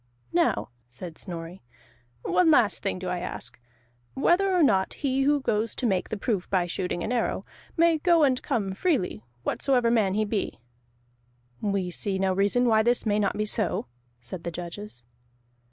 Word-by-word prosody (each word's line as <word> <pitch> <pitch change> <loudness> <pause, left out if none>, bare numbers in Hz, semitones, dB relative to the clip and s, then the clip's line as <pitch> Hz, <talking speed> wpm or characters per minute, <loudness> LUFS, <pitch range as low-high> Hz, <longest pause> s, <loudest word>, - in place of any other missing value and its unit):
"Now," 340 -1 +2 0.2
said 160 +7 -9
Snorri, 170 -1 -7 0.6
"one 360 -3 +3
last 240 -10 +4
thing - - -2
do 185 0 -6
I 180 0 -1
ask, 180 -8 -5 0.6
whether 355 +8 +3
or 360 -3 +4
not 195 -8 +2
he 270 -2 0
who 285 +1 +3
goes 220 -3 0
to 255 - -3
make 190 -5 0
the 220 - -3
proof 200 -3 -2
by 185 -3 +2
shooting 175 0 -3
an 220 - -2
arrow, 245 -2 0 0.3
may 335 -1 +4
go 335 0 +4
and 260 -3 +3
come 215 -8 -1
freely, 235 - 0 0.2
whatsoever 245 - +1
man 205 -5 +2
he 215 0 +1
be?" 205 -1 -2 1.0
"We 195 -3 -1
see 195 +2 -2
no 190 0 +1
reason 205 +6 +2
why 220 -2 +4
this 240 +2 +1
may 210 -1 +2
not 200 -2 0
be 210 - 0
so," 210 -3 0 0.3
said 145 +8 -7
the - - -2
judges. 175 - -7
210 Hz, 170 wpm, -26 LUFS, 185-260 Hz, 1.0 s, last